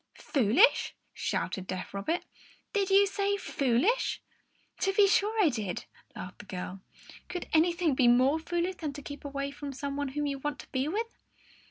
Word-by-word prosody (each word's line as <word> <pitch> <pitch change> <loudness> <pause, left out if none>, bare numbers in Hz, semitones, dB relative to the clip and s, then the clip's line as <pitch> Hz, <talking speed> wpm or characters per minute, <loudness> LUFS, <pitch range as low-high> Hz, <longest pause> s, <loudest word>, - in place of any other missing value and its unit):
"Foolish?" 280 - +3 0.2
shouted 190 -1 -2
deaf 185 0 -5
Robert. 205 - -1 0.5
"Did 400 -3 +1
you 395 +1 +6
say 400 0 0
foolish?" 285 - +1 0.6
"To 390 - +1
be 400 0 +6
sure 420 +3 +2
I 330 - +5
did," 215 -8 -3 0.3
laughed 180 - -8
the 205 - -10
girl. 185 0 -6 0.5
"Could 360 - -4
anything 335 -1 +3
be 255 -1 +4
more 255 +6 +5
foolish 345 +3 -2
than 300 -3 -4
to 290 0 -8
keep 285 +1 -8
away 280 0 -3
from 285 0 -6
some 280 +1 -4
one 285 0 -1
whom 295 +2 -2
you 280 -1 -2
want 295 +1 -3
to - - -19
be 260 +1 0
with?" 445 +7 -3
290 Hz, 175 wpm, -30 LUFS, 260-375 Hz, 0.6 s, you